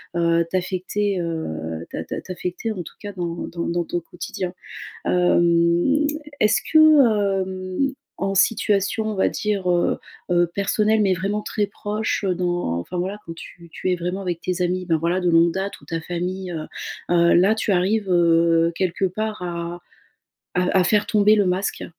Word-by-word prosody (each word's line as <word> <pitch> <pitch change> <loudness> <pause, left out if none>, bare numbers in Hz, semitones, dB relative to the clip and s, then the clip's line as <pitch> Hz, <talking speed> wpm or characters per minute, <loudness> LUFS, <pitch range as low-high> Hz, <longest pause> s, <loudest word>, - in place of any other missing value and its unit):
heu, 170 0 +2
t'affecter, 185 +2 -1
heu, 80 - -4
t'a - - -4
t'a - - -5
t'affecter, 185 +4 -4
en 195 -4 -4
tout - - -12
cas, 205 - -6
dans 175 -3 -3
dans 170 0 -4
dans 175 0 0
ton 175 +1 -3
quotidien. 175 +1 -6 0.5
Hem, 175 - +3 0.4
est-ce 215 -2 +4
que, 315 - +3 0.6
hem, 185 +8 -2 0.2
en 195 0 -1
situation, 205 +1 +2
on - - -4
va 190 - +2
dire, 205 -4 -1
heu, 175 0 +1 0.3
heu, 175 0 +4
personnelle, 215 +2 +2
mais 195 -2 +3
vraiment 200 +4 -2
très 210 -1 -1
proche, 210 +1 -2
heu, 180 - +1
dans 175 - -1
enfin, 175 - -6
voilà, 190 +4 -2
quand 165 - -6
tu 170 0 -12
tu 185 - -2
es - - +2
vraiment 180 +3 -3
avec 175 -3 -3
tes 180 0 -2
amis, 180 +1 0
ben, 165 -2 +2
voilà, 170 +4 0
de 180 - +1
longue 165 0 +4
date 195 +1 -4
ou - - -17
ta 165 -1 -3
famille, 180 +2 -4
heu, 155 -2 -4 0.5
heu, 170 -1 +5
là, 195 +5 +4
tu 220 - -1
arrives, 195 +3 +1
heu, 165 -1 +4
quelque 185 +1 0
part, 215 +2 -3
à 170 -1 -4 0.8
à 180 +1 +2
à - - +3
faire 210 +2 +3
tomber 210 -2 +4
le 205 - +3
masque? 185 +2 -1
180 Hz, 175 wpm, -22 LUFS, 170-200 Hz, 0.8 s, heu